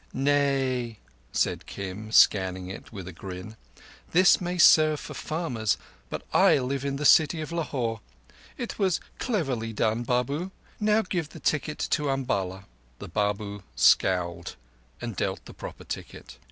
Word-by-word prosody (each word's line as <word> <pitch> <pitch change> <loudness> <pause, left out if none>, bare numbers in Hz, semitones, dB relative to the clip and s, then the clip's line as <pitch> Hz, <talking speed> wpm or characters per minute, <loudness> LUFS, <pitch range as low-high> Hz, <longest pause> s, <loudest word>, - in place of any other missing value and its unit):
"Nay," 135 -4 +1 0.3
said - - 0
Kim, 100 +3 -6
scanning 95 -4 +4
it 95 - -9
with 95 -4 -8
a 95 - -7
grin. 95 +5 -8 0.6
"This 185 +3 +6
may 180 0 -2
serve 155 -3 +6
for - - -8
farmers, 140 -10 -1 0.3
but - - -5
I - - +6
live 135 +1 -2
in 140 -1 -1
the 150 +2 -3
city 160 +2 +6
of 155 +1 -5
Lahore. 125 -9 -2 0.6
It 240 - -5
was 190 -4 +2 0.2
cleverly 135 - -1
done, 110 +2 +1
Babu. 125 +8 -1 0.3
Now 215 +1 +3
give 175 -5 -3
the - - -11
ticket 150 0 -1
to 150 -3 +1
Umballa." 100 -8 -1 0.3
The - - -9
Babu 100 0 -2
scowled 90 -2 +2 0.4
and 120 -3 -5
dealt - - -2
the - - -11
proper - - -9
ticket. - - -8
130 Hz, 145 wpm, -27 LUFS, 105-155 Hz, 0.6 s, This